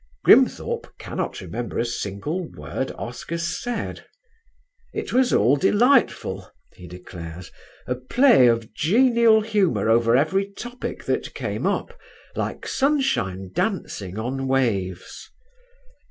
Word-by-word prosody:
Grimthorpe - - +3
cannot - - -4
remember 115 +7 -5
a 120 - +1
single 120 - -4
word 130 - -4
Oscar 125 +8 -5
said: 170 +8 -4 0.9
"It - - -4
was 255 0 +3
all 125 +7 +4
delightful," 205 - +2 0.2
he 90 - -12
declares, 90 -1 -9 0.3
"a 125 - -1
play 130 - +4
of 115 -1 0
genial 230 - +4
humour 190 - +1
over 115 +1 +4
every 195 +8 +1
topic 245 +4 -6
that - - -2
came - - -2
up, - - -2 0.4
like - - -4
sunshine 180 - 0
dancing 105 - -3
on 130 +4 -3
waves." 100 -9 -1
130 Hz, 110 wpm, -23 LUFS, -, 0.9 s, all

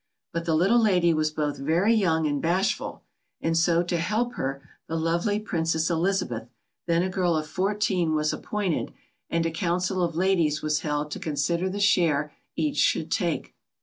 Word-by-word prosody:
But 170 0 -2
the 165 -1 +1
little 195 +9 +4
lady 180 -6 +3
was 155 0 +1
both 150 -1 -2
very 170 +10 +2
young 165 -7 +2
and 145 -2 0
bashful, 180 +4 -1 0.4
and 165 0 0
so 170 +1 +3
to 175 0 -1
help 215 +8 -1
her 135 - -4 0.2
the 165 - -3
lovely 170 +6 0
Princess 165 -5 0
Elizabeth, 165 - -1 0.4
then 170 0 +2
a - - 0
girl 180 -2 +1
of 155 - -2
fourteen, 185 -2 0
was 150 0 +1
appointed, 205 -6 -2 0.4
and 165 0 0
a 165 - 0
council 180 +2 -1
of 170 -2 0
ladies 170 -4 +1
was 155 -1 +1
held 150 0 -2
to - - -4
consider 170 +4 -1
the 200 +2 -4
share 160 -8 +2 0.2
each 300 -2 -1
should - - +2
take. - - -1
170 Hz, 175 wpm, -26 LUFS, 155-185 Hz, 0.4 s, little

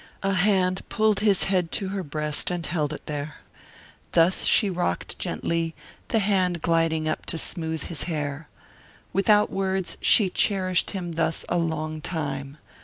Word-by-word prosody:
A 195 0 +1
hand 185 -1 +2
pulled 215 -2 +2
his 205 -2 +3
head 180 -3 +1
to 195 -3 -2
her 195 0 -2
breast 150 -2 -3
and 175 -2 -3
held 155 -4 -1
it 150 - -7
there. 150 0 -4 0.8
Thus 170 +2 +4
she 215 - +5
rocked 175 - -2
gently, 165 -1 -1 0.3
the - - +1
hand 185 -5 +1
gliding 165 -2 +2
up 155 - -2
to - - -2
smooth 160 -1 -1
his 170 - -4
hair. 145 -1 -3 0.7
Without 210 +2 +4
words 190 -1 -1
she 195 -5 +5
cherished 185 -3 +1
him 180 -4 -4
thus 160 0 -1
a 175 - +1
long 155 -1 -2
time. 140 -4 -4
170 Hz, 155 wpm, -25 LUFS, 155-190 Hz, 0.8 s, she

